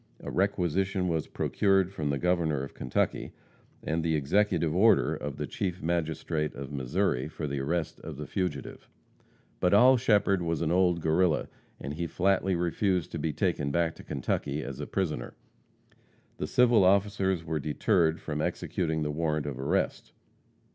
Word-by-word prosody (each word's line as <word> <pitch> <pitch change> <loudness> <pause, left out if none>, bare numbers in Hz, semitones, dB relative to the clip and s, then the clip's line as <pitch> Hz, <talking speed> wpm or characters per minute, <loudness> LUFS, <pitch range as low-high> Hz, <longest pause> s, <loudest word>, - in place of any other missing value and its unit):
A - - -7
requisition 95 0 0
was 80 -3 -1
procured 95 -2 +1
from 75 -6 -2
the 70 - 0
Governor 80 -4 0
of 70 - -8
Kentucky, 65 - -2 0.5
and 80 +1 -1
the 80 -1 +1
executive 85 +2 +1
order 110 +4 +4
of 75 -1 -5
the 75 - -2
Chief 90 +2 -3
Magistrate 80 -2 -1
of 70 +1 -7
Missouri, 65 0 0
for 80 0 -6
the 70 -1 -2
arrest 80 +4 -2
of 80 -3 -8
the 75 - -5
fugitive. 90 -8 -4 0.7
But 90 +2 +3
Oll 125 +5 +7
Shepherd 105 -5 +2
was 85 -1 -1
an 80 - 0
old 90 -1 +3
Guerrilla, 80 +1 +2 0.3
and 70 +2 -5
he 85 +2 -3
flatly 95 +1 +1
refused 90 +1 0
to - - -4
be 80 - -1
taken 70 0 -1
back 85 +2 +1
to - - -13
Kentucky 70 +2 -2
as 70 0 -7
a 75 - -4
prisoner. 80 -11 -3 1.0
The - - -3
civil 120 -4 +4
officers 95 -2 +2
were 80 -1 -2
deterred 80 +3 +1
from 75 -1 -4
executing 80 -1 -1
the 75 - -1
warrant 75 -1 -1
of 70 -3 -5
arrest. 80 +9 -1
85 Hz, 160 wpm, -28 LUFS, 75-95 Hz, 1.0 s, Oll